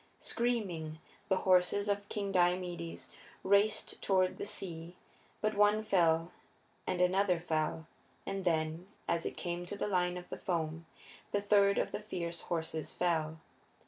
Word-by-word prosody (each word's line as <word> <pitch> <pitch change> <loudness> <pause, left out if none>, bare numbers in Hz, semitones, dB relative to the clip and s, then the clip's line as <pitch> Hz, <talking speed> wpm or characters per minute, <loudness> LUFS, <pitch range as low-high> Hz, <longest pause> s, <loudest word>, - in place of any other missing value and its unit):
Screaming, 190 -10 -1 0.3
the 190 - +4
horses 185 +2 +3
of 205 0 -1
King 200 -2 -2
Diomedes 175 -2 0 0.3
raced 200 +2 +2
toward 185 -2 +2
the - - -3
sea, 170 -2 -5 0.5
but 215 0 +1
one 210 +1 +4
fell 170 -5 +3 0.6
and 185 - 0
another 180 0 +3
fell, 160 -1 -1 0.4
and 195 -1 -3
then, 160 0 0 0.2
as 170 -1 +1
it - - -6
came 175 -1 -3
to 205 - -5
the - - -1
line 180 -2 +1
of 180 - -8
the - - -6
foam, 165 -2 -2 0.4
the 205 - +2
third 200 -1 +4
of - - 0
the - - -3
fierce 170 -5 -4
horses 160 -2 -3
fell. 160 -2 0
180 Hz, 145 wpm, -33 LUFS, 165-200 Hz, 0.6 s, the